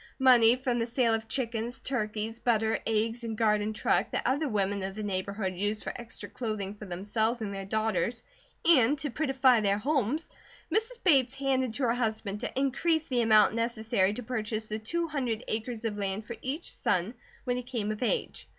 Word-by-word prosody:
Money 245 -3 +6
from 250 -2 -1
the 230 - 0
sale 235 -1 +2
of 225 0 -2
chickens, 235 0 -2
turkeys, 220 -2 -3
butter, 225 -2 +1
eggs, 225 +2 0
and 225 -2 -4
garden 210 -1 +2
truck 215 - +1
that - - -2
other 280 +4 +1
women 200 -2 0
of 190 0 -4
the 215 - -5
neighbourhood 195 0 -2
used 205 +3 -2
for - - -4
extra 235 -1 -8
clothing 215 -5 -4
for 210 0 -10
themselves 220 +6 -1
and 210 -3 -4
their 195 0 -5
daughters 220 +2 0 0.4
and 290 -4 +5
to 285 +1 -2
prettify 265 -5 +3
their 200 -1 +2
homes, 280 +4 0 0.5
Mrs. 450 +4 -1
Bates 270 -7 +4
handed 260 -4 0
to 280 - -2
her 230 -2 +3
husband 220 -4 -2
to - - -3
increase 310 +4 +1
the 250 -2 +2
amount 220 -2 +5
necessary 225 -3 +1
to 245 - -6
purchase 220 -2 -3
the 215 +1 -3
two 335 +10 -2
hundred 250 -7 -2
acres 225 +1 -3
of 210 -2 -2
land 200 +2 -2
for 235 - -6
each 285 +6 -3
son 185 +3 0 0.3
when 245 0 -1
he - - -2
came 235 -4 -3
of 215 - -6
age. 455 - -1
225 Hz, 190 wpm, -29 LUFS, 215-255 Hz, 0.5 s, Money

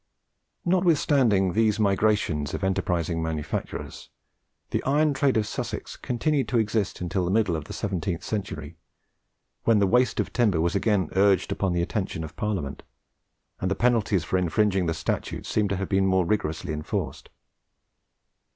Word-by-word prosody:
Notwithstanding 145 - +3
these 110 -1 +2
migrations 100 -7 +1
of - - -5
enterprising 85 -3 0
manufacturers, 80 -2 -4 0.6
the - - 0
iron 150 +2 +2
trade 135 -2 +2
of 110 - +1
Sussex - - -5
continued 135 +3 -1
to 125 - +1
exist 105 -3 0
until 90 +1 -1
the 90 - -1
middle 100 -3 +2
of 80 -2 -4
the - - -8
seventeenth 95 -4 -3
century, 85 -7 -4 0.9
when 115 -2 +5
the 100 - +4
waste 125 +6 +2
of - - -1
timber 105 -9 +2
was 85 +2 +1
again 100 -4 +1
urged 95 -1 +3
upon 95 -3 0
the 85 0 +1
attention 95 -3 -3
of 80 +2 -8
Parliament, 90 -10 -3 0.8
and 95 - -1
the 95 - 0
penalties 110 -7 +2
for 95 +4 0
infringing 95 +1 +1
the 80 - 0
statutes - - -3
seem 105 -2 +1
to 100 - -1
have 95 0 -3
been 95 -1 +2
more 95 -1 +3
rigorously 85 -4 -1
enforced. 75 0 -4
95 Hz, 155 wpm, -26 LUFS, 85-110 Hz, 0.9 s, when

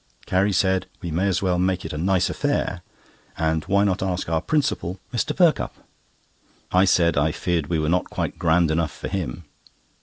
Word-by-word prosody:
Carrie 95 +2 +2
said 95 0 +1 0.2
we 85 - -3
may 90 +5 +1
as 95 0 0
well 90 -2 +1
make 90 -1 0
it 80 - -5
a - - -4
nice 90 +1 +2
affair, - - -1 0.6
and 80 -1 0
why 100 +1 +3
not 95 -2 0
ask 95 -2 -2
our 80 -1 +1
principal, 130 - -1
Mr. 150 +5 -1
Perkupp? 175 -4 +2 1.0
I 90 +1 +5
said 85 -4 +3
I 80 +2 +2
feared 85 -2 -1
we 85 - 0
were 75 -1 0
not 90 +3 +1
quite - - -3
grand 85 -1 +3
enough 80 -1 0
for - - -7
him. 60 +8 -4
90 Hz, 185 wpm, -23 LUFS, 80-95 Hz, 1.0 s, I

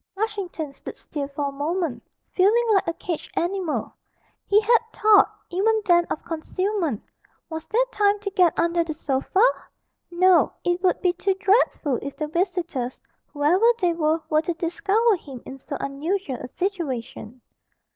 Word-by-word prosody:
Flushington 385 -8 -4
stood - - -9
still 285 -3 -5
for 280 0 -3
a - - -8
moment, 295 -2 -2 0.3
feeling 420 +6 +3
like 390 - +2
a 335 - 0
caged 340 -4 -5
animal; 355 -2 -1 0.5
he 405 - +5
had 455 +2 +4
thoughts, 430 -2 +5 0.2
even 435 +5 +2
then, 345 -2 +4
of - - -4
concealment 340 - -2 0.5
was 320 0 -6
there 485 +3 +2
time 410 0 +2
to 400 -1 -4
get 360 -3 +3
under 340 0 +2
the 315 -2 -5
sofa? 280 +9 0 0.7
No, 360 0 +4
it 350 0 0
would 370 -1 +1
be 360 -1 +2
too 380 +2 0
dreadful 385 - +2
if 280 0 -7
the 305 - -2
visitors, 335 -6 -2 0.3
whoever 305 +7 +1 0.2
they 355 -3 +2
were, 320 0 0
were 310 0 +2
to 345 +1 -3
discover 405 +6 +1
him 270 -7 -11
in 270 - -9
so 280 +1 -6
unusual 285 +1 -3
a - - -7
situation. 260 - -4
345 Hz, 155 wpm, -24 LUFS, 295-390 Hz, 0.7 s, he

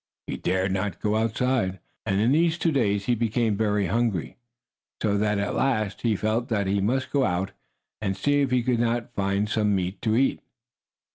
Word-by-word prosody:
He - - -4
dared 95 +1 0
not 95 +1 -2
go 105 0 0
outside. 110 -3 0 0.3
And 95 0 +1
in 115 +4 +3
these 165 +3 +3
two 170 -1 +1
days 105 -8 +1
he 125 - +2
became 115 -1 +1
very 105 -1 +1
hungry, 110 -3 -1 0.6
so 105 -2 +1
that 105 0 +1
at 100 0 -1
last 110 -7 0
he 115 -3 +1
felt 110 +4 -1
that 105 -3 0
he 100 +1 +1
must 130 +6 0
go 140 -2 +2
out 90 -2 0 0.5
and 95 -2 -1
see 145 +8 +2
if 140 - +1
he 125 -1 +2
could 120 -1 +1
not 120 0 -1
find 100 0 0
some 105 -2 +1
meat 95 +1 -3
to 110 -2 +1
eat. 135 +3 +2
110 Hz, 195 wpm, -25 LUFS, 100-120 Hz, 0.6 s, in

